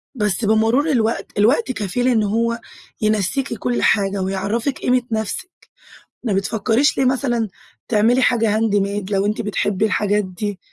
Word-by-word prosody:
بس 210 -2 0
بمرور 225 +8 +2
الوقت، 230 -4 0
الوقت 255 - +3
كفيل 245 +2 -2
إن 230 -4 +3
هو 230 +3 0 0.4
ينسيكِ 215 +6 0
كل 245 +3 -1
حاجة، 200 -1 +2
ويعَرَفِك 205 +8 -2
قيمة 250 0 +2
نفسك. 220 - -2 0.7
ما 225 -5 0
بتفكريش 225 +7 +1
ليه 265 - +2
مثلًا، 245 -4 0 0.4
تعملي 235 +3 +3
حاجة 225 -4 +2
handmade 205 -2 0
لو 195 0 +1
أنتِ 210 - -1
بتحبِي 205 -1 0
الحاجات 210 0 +1
دي؟ 195 +2 -5
220 Hz, 140 wpm, -20 LUFS, 205-240 Hz, 0.7 s, الوقت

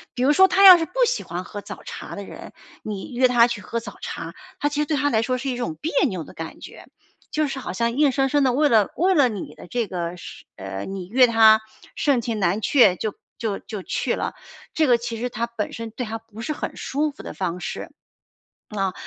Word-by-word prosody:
比 250 - -1
如 290 - +5
说 380 +5 +7
他 390 +1 +4
要 365 -2 +11
是 325 - -1
不 - - -27
喜 - - -1
欢 175 +2 -5
喝 205 +2 -8
早 - - -10
茶 - - -8
的 200 - -6
人， - - -11 0.3
你 210 +3 -6
约 255 +1 +4
他 240 -2 +5
去 235 -3 -3
喝 230 +5 -3
早 230 - -10
茶， - - -6 0.3
他 290 - +1
其 290 0 -2
实 300 - -1
对 305 - 0
他 290 0 +1
来 220 - +2
说 255 +3 -1
是 265 +1 -3
一 - - -3
种 240 -10 -3
别 315 - -4 0.2
扭 185 -8 -4
的 - - -13
感 165 0 -8
觉， - - -12 0.4
就 305 -1 0
是 270 0 -4
好 - - -5
像 235 +4 -1
硬 290 -3 +5
生 270 +1 +1
生 290 +1 +2
地 260 - +3
为 295 +5 +3
了 220 -7 +4
为 375 +3 +3
了 285 -7 +4
你 205 -5 -6
的 - - -13
这 235 +3 -1
个， 175 -2 -4
是 - - -11
呃， 95 0 -6
你 195 -2 -6
约 250 +7 +5
他， 220 -1 +6 0.3
盛 280 -4 +2
情 230 -2 -3
难 195 +3 +1
却 240 -9 +5
就 215 +2 -3 0.2
就 215 -4 -3
就 205 -4 -7
去 - - -1
了。 - - -3 0.4
这 315 -3 +2
个 240 -1 +5
其 230 -1 -5
实 250 +2 -2
他 235 0 -2
本 235 -3 -4
身 230 -1 -6
对 245 - -5
他 225 +1 -4
不 225 -1 -12
是 270 - -3
很 300 - -4
舒 295 +2 -1
服 - - -12
的 - - -8
方 180 -1 -3
式。 - - -6 0.8
呃， 195 -3 -1
235 Hz, 265 characters per minute, -23 LUFS, 205-275 Hz, 0.8 s, 要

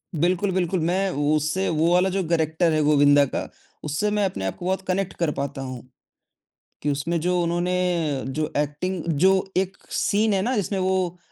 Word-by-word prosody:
बिल्कुल, 180 +5 +1
बिल्कुल। 185 0 0
मैं 185 +4 +1 0.3
उससे 155 +6 0
वो 165 +2 +2
वाला 180 +2 +3
जो 190 0 -1
करैक्टर 160 +1 +1
है 155 - +2
गोविंदा 145 -1 +5
का - - -2 0.4
उससे 150 +8 -1
मैं 210 -1 +1
अपने 180 - -3
आप 95 - -2
को 175 - -8
बहुत 190 +1 0
कनेक्ट 190 0 -1
कर 170 -3 0
पाता 140 -1 -3
हूँ, 130 -2 -6 1.0
कि 150 - -1
उसमें 165 +5 -1
जो 180 +2 +1
उन्होंने 175 -4 0
जो 150 +3 -2
एक्टिंग 150 +5 -2 0.2
जो 190 +4 +6 0.3
एक 190 0 -1
सीन 210 +1 +1
है 195 - +1
ना 250 +6 0
जिसमें 200 -2 -1
वो 185 -1 0
175 Hz, 180 wpm, -24 LUFS, 150-190 Hz, 1.0 s, जो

